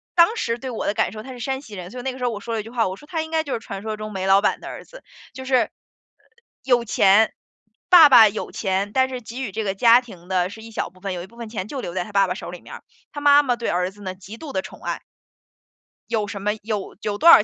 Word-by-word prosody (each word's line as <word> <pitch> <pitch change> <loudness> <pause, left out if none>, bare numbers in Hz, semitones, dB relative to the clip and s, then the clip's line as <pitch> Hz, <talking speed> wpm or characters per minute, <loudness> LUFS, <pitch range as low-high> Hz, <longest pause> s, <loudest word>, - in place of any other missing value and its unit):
当 345 +6 +5
时 230 - -1
对 260 +2 -6
我 230 - -4
的 200 - +1
感 200 - 0
受 215 +1 -8
他 260 - -9
是 250 - -9
山 265 +3 -2
西 220 -7 -11
人， 180 -1 -8
所 250 - -7
以 - - -7
那 265 - -1
个 255 - -10
时 250 - -6
候 245 - +1
我 210 - -5
说 230 +3 -5
了 225 - -1
一 - - -10
句 225 - -10
话， 230 -3 0
我 185 - -4
说 295 - -16
他 325 -2 -1
应 320 0 -7
该 320 -1 +1
就 285 - -4
是 - - -1
传 195 -3 -7
说 215 0 -4
中 215 0 -6
煤 190 -2 -3
老 195 +1 +6
板 - - +1
的 - - -9
儿 - - -8
子， - - -14 0.3
就 260 +1 -8
是， 260 0 +2
呃， 250 - +3 0.9
有 245 -2 +3
钱， 205 +1 +4 0.6
爸 340 -5 +9
爸 235 -5 +9
有 215 - -5
钱， 195 0 -1
但 260 0 +3
是 255 -1 -5
给 235 +3 -7
予 220 - -4
这 220 +3 -3
个 195 -2 -1
家 235 +4 +6
庭 185 -8 -14
的 180 -1 +1
是 220 +3 -10
一 225 +1 -11
小 - - -3
部 185 - -22
分， 195 0 -4
有 175 -1 -5
一 - - -10
部 235 +4 -20
分 235 -2 -7
钱 210 -3 -4
就 270 +2 -5
留 175 - -5
在 185 0 -1
他 210 - -11
爸 195 -1 +3
爸 180 - -1
手 - - -7
里 180 - -9
面 - - -10
儿。 - - -12 0.3
他 290 - -6
妈 290 0 +6
妈 250 -3 +1
对 235 -1 -3
儿 180 +1 0
子 205 +1 -17
呢， 185 -2 -4
极 195 +4 -11
度 290 +1 -8
地 285 - 0
宠 - - -12
爱 - - -3 1.1
有 220 -3 0
什 200 -1 -6
么 210 +1 +1
有 210 -2 -4
有 205 -1 -2
多 335 - +6
少 220 - +9
220 Hz, 335 characters per minute, -22 LUFS, 195-260 Hz, 1.1 s, 爸